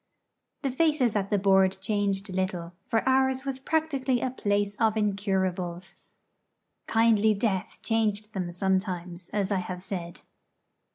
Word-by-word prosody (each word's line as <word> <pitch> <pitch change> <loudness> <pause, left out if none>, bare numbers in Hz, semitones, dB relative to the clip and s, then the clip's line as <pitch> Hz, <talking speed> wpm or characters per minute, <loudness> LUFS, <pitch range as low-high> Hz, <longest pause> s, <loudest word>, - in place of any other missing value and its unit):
The 270 - 0
faces 275 -5 +2
at 200 -1 0
the 205 - +2
board 190 -1 +4
changed 200 -1 0
little; 180 -2 -2 0.2
for 225 +2 +1
ours 265 0 +2
was 270 -1 -2
practically 275 -4 0
a 255 - -1
place 205 -4 0
for 225 0 +3
incurables. 190 -3 -1 0.9
Kindly 220 -1 +4
Death 200 -3 -1
changed 215 -2 0
them 180 -3 -3
sometimes, 180 -1 -2
as 200 -1 -1
I 195 - +2
have 180 0 -5
said. 175 -3 -5
205 Hz, 130 wpm, -27 LUFS, 190-230 Hz, 0.9 s, board